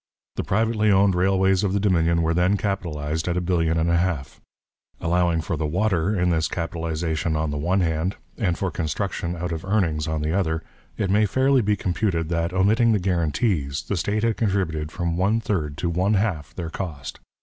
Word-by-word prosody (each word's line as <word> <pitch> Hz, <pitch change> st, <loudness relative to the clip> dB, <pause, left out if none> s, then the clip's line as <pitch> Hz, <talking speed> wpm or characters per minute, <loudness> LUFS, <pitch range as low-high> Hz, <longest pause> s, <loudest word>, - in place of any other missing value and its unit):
The -, -, -2 dB
privately 110 Hz, +1 st, +1 dB
owned 100 Hz, 0 st, +4 dB
railways 95 Hz, +1 st, +2 dB
of 95 Hz, -2 st, 0 dB
the 100 Hz, -, +1 dB
Dominion 85 Hz, -4 st, +2 dB
were 80 Hz, +1 st, +1 dB
then 90 Hz, +4 st, +2 dB
capitalized 80 Hz, -6 st, -2 dB
at 90 Hz, 0 st, 0 dB
a -, -, +3 dB
billion 85 Hz, -2 st, +1 dB
and 80 Hz, +1 st, +1 dB
a 85 Hz, -, +3 dB
half; 85 Hz, -7 st, -2 dB, 0.6 s
allowing 85 Hz, 0 st, +1 dB
for 80 Hz, -, -3 dB
the 75 Hz, 0 st, -2 dB
'water' 95 Hz, +2 st, +1 dB
in 90 Hz, 0 st, +2 dB
this 80 Hz, -1 st, +1 dB
capitalization 80 Hz, -1 st, -2 dB
on 75 Hz, -1 st, -1 dB
the 75 Hz, -, -3 dB
one 90 Hz, +5 st, +1 dB
hand, 85 Hz, +3 st, 0 dB, 0.2 s
and 90 Hz, -6 st, 0 dB
for 95 Hz, -2 st, -2 dB
construction 85 Hz, +2 st, -3 dB
out 85 Hz, +1 st, -4 dB
of 80 Hz, -1 st, -4 dB
earnings 85 Hz, -7 st, 0 dB
on 80 Hz, -1 st, -2 dB
the 80 Hz, +1 st, -1 dB
other, 80 Hz, -4 st, 0 dB, 0.3 s
it 95 Hz, -3 st, 0 dB
may 105 Hz, +1 st, +4 dB
fairly 130 Hz, +5 st, +3 dB
be 105 Hz, -1 st, +1 dB
computed 90 Hz, -3 st, -1 dB
that, 85 Hz, 0 st, 0 dB
omitting 110 Hz, +5 st, +3 dB
the 105 Hz, -, +2 dB
guarantees, 85 Hz, -, 0 dB
the 100 Hz, -, -2 dB
state 100 Hz, +5 st, -1 dB
had 115 Hz, -1 st, +1 dB
contributed 90 Hz, -8 st, -1 dB
from 85 Hz, -1 st, -2 dB
one 100 Hz, +5 st, +2 dB
third 80 Hz, -10 st, -2 dB
to 90 Hz, -, -1 dB
one 90 Hz, +5 st, +1 dB
half 95 Hz, -8 st, -1 dB
their 85 Hz, -3 st, -5 dB
cost. 75 Hz, -8 st, -6 dB
90 Hz, 195 wpm, -23 LUFS, 80-100 Hz, 0.6 s, owned